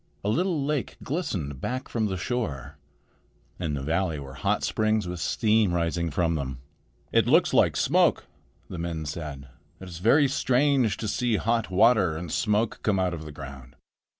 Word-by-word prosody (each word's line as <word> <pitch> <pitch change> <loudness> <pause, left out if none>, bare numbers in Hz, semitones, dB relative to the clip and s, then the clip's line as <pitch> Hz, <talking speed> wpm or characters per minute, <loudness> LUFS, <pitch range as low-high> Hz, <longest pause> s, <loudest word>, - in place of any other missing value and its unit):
A 100 - 0
little 165 - 0
lake 150 -3 -2
glistened 95 - -3
back 130 +1 -3
from 110 -5 -1
shore. 95 - -4 0.8
In 80 -5 -2
the 70 - -4
valley 85 +2 0
were 70 -1 -8
hot 70 - -1
springs, 110 -2 +1
with 90 -1 -5
steam 105 +1 +2
rising 85 0 0
from 85 +2 0
them. 65 -4 -3 0.5
"It - - +3
looks - - +4
like - - +4
smoke," - - +3 0.4
the 90 - -7
men 85 -2 -3
said. 70 -3 -6 0.3
"It 95 - -9
is 85 -2 -8
very 140 - +4
strange 130 -4 +2
to 110 - -4
see 120 +2 0
hot 115 +1 0
water 95 -4 +4
and 85 -1 -6
smoke 105 0 0
come 105 -5 +1
out 90 -1 0
of 80 -2 -6
the 75 - -8
ground." 70 -3 -10
95 Hz, 170 wpm, -26 LUFS, 80-115 Hz, 0.8 s, looks